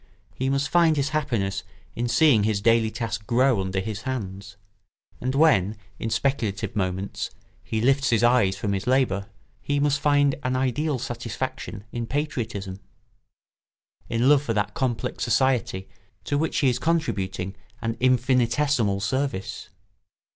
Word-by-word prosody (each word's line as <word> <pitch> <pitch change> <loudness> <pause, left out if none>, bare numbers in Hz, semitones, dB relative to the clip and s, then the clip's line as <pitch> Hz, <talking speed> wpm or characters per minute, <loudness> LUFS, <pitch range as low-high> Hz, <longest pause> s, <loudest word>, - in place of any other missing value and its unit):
He 130 +1 -2
must 140 +1 +1
find 165 -2 +4
his 140 0 +1
happiness 115 -11 -1 0.3
in 120 +1 -1
seeing 125 -4 +4
his 105 -1 +1
daily 115 +1 +3
task 110 -2 -4
grow 125 -2 +3
under 95 0 -2
his 105 +2 -4
hands; 100 -5 -5 0.6
and 130 +2 -2
when, 110 - +4 0.2
in 115 - -2
speculative 110 -6 -1
moments, 95 0 -2 0.3
he 110 - -2
lifts 135 +2 +3
his 115 -1 +2
eyes 120 -6 +4
from 100 0 -1
his 95 +4 -3
labour, 120 -7 +2 0.3
he 145 0 0
must 140 -1 +2
find 145 -1 +3
an 130 -1 -1
ideal 135 +3 0
satisfaction 105 - -5
in 120 -1 -4
patriotism, 110 -10 -3 1.3
in 115 +2 +1
love 145 -1 +6
for 115 -6 -2
that 105 -1 0
complex 120 -4 -2
society 120 -6 +1 0.4
to 145 - -1
which 155 +2 0
he 135 - +4
is 125 - -1
contributing 95 - -1 0.3
an 115 0 -2
infinitesimal 125 -3 +2
service. 130 -3 -2
120 Hz, 140 wpm, -25 LUFS, 100-135 Hz, 1.3 s, love